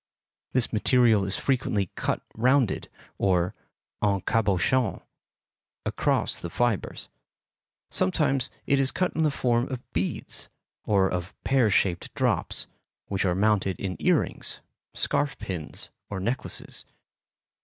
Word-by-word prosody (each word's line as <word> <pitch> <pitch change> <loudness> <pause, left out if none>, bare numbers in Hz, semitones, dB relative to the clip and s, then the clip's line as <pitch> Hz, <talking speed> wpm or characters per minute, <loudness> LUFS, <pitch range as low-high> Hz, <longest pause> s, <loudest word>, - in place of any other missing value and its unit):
This 125 -3 +2
material 110 -2 +4
is 95 - 0
frequently 115 -8 0
cut - - -1
rounded, 125 0 +2 0.3
or 90 -2 +2 0.5
en 100 -2 +2
cabochon, 110 +3 +2 0.9
across - - +1
the 85 - -4
fibres; 120 +2 -1 0.8
sometimes 130 +8 +2 0.2
it 140 - +3
is 135 -1 +3
cut 185 +5 0
in 160 - +1
the 155 - +4
form 120 -3 +1
of 130 -2 -7
beads, 90 +3 -2 0.4
or 100 -2 +3
of 90 0 -3
pear 130 -5 +3
shaped 95 -3 +1
drops, - - 0 0.4
which 100 -1 0
are 90 -2 +2
mounted 100 -2 +2
in 95 -2 -3
ear - - +4
rings, - - -7 0.3
scarf 140 -3 0
pins, 85 -5 -6 0.2
or 100 - -3
necklaces. 115 +7 -2
105 Hz, 120 wpm, -27 LUFS, 95-125 Hz, 0.9 s, material